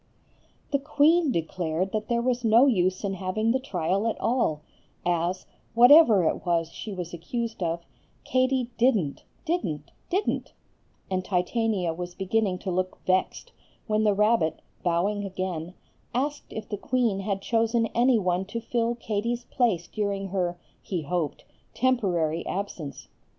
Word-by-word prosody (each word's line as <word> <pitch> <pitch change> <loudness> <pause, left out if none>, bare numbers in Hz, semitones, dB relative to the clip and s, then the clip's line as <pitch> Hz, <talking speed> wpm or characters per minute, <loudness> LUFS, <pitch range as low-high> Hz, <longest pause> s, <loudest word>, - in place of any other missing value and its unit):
The 280 - +2
queen 300 +2 +3
declared 170 0 -1
that 215 0 -2
there 235 0 +1
was 250 -1 0
no 230 +3 +6
use 185 -7 +2
in 200 -1 -1
having 190 +4 0
the 260 - +2
trial 195 -3 -1
at 225 - -2
all, 230 -11 +1 0.4
as, 175 +1 0 0.3
whatever 245 - +8
it - - -1
was 170 -2 0
she 215 - -7
was 180 -3 -5
accused 225 +6 -4
of, 170 0 -2 0.4
Katie 255 -1 +1
didn't, 215 - +2 0.2
didn't, 160 - -2 0.2
didn't; 385 +4 -1 0.6
and 185 -1 0
Titania 185 -1 0
was 175 +1 -6
beginning 195 0 0
to 190 - -1
look 185 +1 -1
vexed, 185 0 0 0.3
when 215 0 +1
the 210 -2 +3
rabbit, 210 -7 +2 0.2
bowing 185 +4 0
again, 185 -3 -4 0.4
asked 290 +3 -2
if 220 -1 -6
the 205 - -4
queen 230 -3 0
had 195 0 -2
chosen 230 +1 +2
any 245 +1 +4
one 180 -2 0
to 220 +4 -4
fill 235 0 -1
Katie's 235 +1 -2
place 215 -9 +1
during 200 -2 -2
her 180 -2 -1 0.2
(he 180 -5 -3
hoped) 165 -1 -2 0.3
temporary 180 -11 +1
absence. 185 -7 -5
200 Hz, 145 wpm, -26 LUFS, 180-235 Hz, 0.6 s, whatever